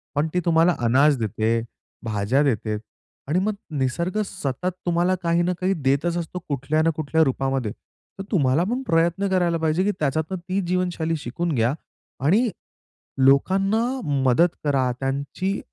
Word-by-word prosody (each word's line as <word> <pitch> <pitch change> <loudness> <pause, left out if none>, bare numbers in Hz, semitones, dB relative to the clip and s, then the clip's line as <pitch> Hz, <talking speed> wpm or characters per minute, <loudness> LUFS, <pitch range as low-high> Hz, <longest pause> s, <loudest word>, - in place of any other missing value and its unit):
पण 145 +2 +1
ती 180 - +2
तुम्हाला 170 +1 +4
अनाज 135 +4 +4
देते, 110 +1 0 0.4
भाज्या 110 +4 +1
देते 110 -5 0 0.5
आणि 160 +6 +1
मग 210 +3 0 0.3
निसर्ग 170 +10 -1
सतत 180 -1 -3
तुम्हाला 175 +2 +2
काही 170 0 +2
ना 180 +1 +1
काही 190 +1 +2
देतच 155 +3 0
असतो, 170 +2 -4
कुठल्या 145 +3 0
ना 165 - +3
कुठल्या 160 +1 +2
रूपामध्ये. 135 -4 -1 0.5
तर - - -3
तुम्हाला 145 -3 +3
पण, 245 +7 -1
प्रयत्न 170 +4 +2
करायला 175 -3 +2
पाहिजे, 160 +3 +1
की 205 - +2
त्याच्यातून 155 +5 -1
ती 185 +3 -2
जीवनशैली 175 -2 -1
शिकून 165 +7 -3
घ्या 120 +3 +2 0.5
आणि 220 - +4 0.8
लोकांना 195 +11 +3 0.4
मदत 165 +8 +5 0.2
करा, 135 -4 +1
त्यांची 140 +9 -2
160 Hz, 145 wpm, -23 LUFS, 135-180 Hz, 0.8 s, मदत